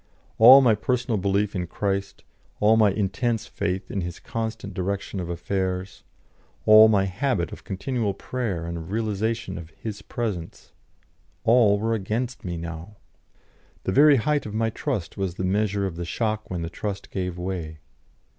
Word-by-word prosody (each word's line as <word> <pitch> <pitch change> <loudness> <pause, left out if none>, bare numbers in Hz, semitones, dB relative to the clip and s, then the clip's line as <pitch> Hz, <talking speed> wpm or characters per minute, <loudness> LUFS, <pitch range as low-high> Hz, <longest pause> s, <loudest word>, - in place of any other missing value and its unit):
All 130 +5 +10
my 120 -4 +5
personal 120 +1 -1
belief 100 +2 0
in 90 -2 -2
Christ, 100 +2 -3 0.4
all 105 +2 +5
my 110 -2 +5
intense 110 +4 -1
faith 95 -1 -3
in 100 - -2
His 85 -1 -5
constant 110 -3 -5
direction 95 +2 -3
of 85 -2 -4
affairs, 95 +1 -3 0.6
all 110 0 +9
my 100 -3 +3
habit 95 - -1
of - - -10
continual 105 +1 -2
prayer 100 -7 -3
and 85 0 -4
of 80 +1 -9
realisation 110 -2 -2
of 80 -2 -10
His 105 +5 -7
Presence 100 -9 -5 0.7
all 115 -3 +5
were 110 +2 0
against 115 +4 -3
me 85 -2 -4
now. 85 +5 -7 0.9
The - - -1
very 145 +7 +7
height 145 +2 0
of 105 - -6
my 115 0 +1
trust 110 - -3
was 95 -3 -2
the 95 - -4
measure 100 +1 +1
of 90 -4 -4
the 85 - -3
shock 110 +5 -2
when 90 -2 -3
the 85 - -4
trust 100 +1 -5
gave 90 -2 -3
way. 90 -4 -4
100 Hz, 165 wpm, -25 LUFS, 90-110 Hz, 0.9 s, All